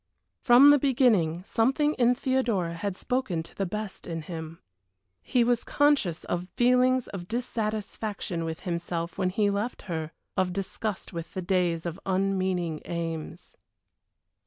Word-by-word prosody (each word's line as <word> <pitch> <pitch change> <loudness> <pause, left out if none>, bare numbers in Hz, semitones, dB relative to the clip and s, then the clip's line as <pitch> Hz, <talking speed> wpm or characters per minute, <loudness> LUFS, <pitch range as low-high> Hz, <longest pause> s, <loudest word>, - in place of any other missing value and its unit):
From 265 +3 +8
the 290 - +5
beginning 220 - +3
something 265 +8 +2
in 245 -2 +3
Theodora 240 -10 0
had 190 +3 -3
spoken 250 -11 -1
to 165 - -14
the 195 - -2
best 210 +1 -5
in 165 -2 -4
him. 160 0 -7 0.6
He 245 -2 +2
was 240 0 +2
conscious 285 - +2
of 175 +1 -3
feelings 250 +1 +4
of 175 -3 -7
dissatisfaction 215 -5 -3
with 160 -1 -4
himself 170 0 -3
when 185 -1 +2
he 205 +2 +1
left 205 +5 -3
her, 160 -3 -4 0.2
of 185 -1 +1
disgust 195 +1 -4
with 170 -1 -6
the 185 - -2
days 175 -3 +1
of 170 +2 -4
unmeaning 185 -4 0
aims. 165 -2 -5
195 Hz, 140 wpm, -27 LUFS, 170-240 Hz, 0.6 s, From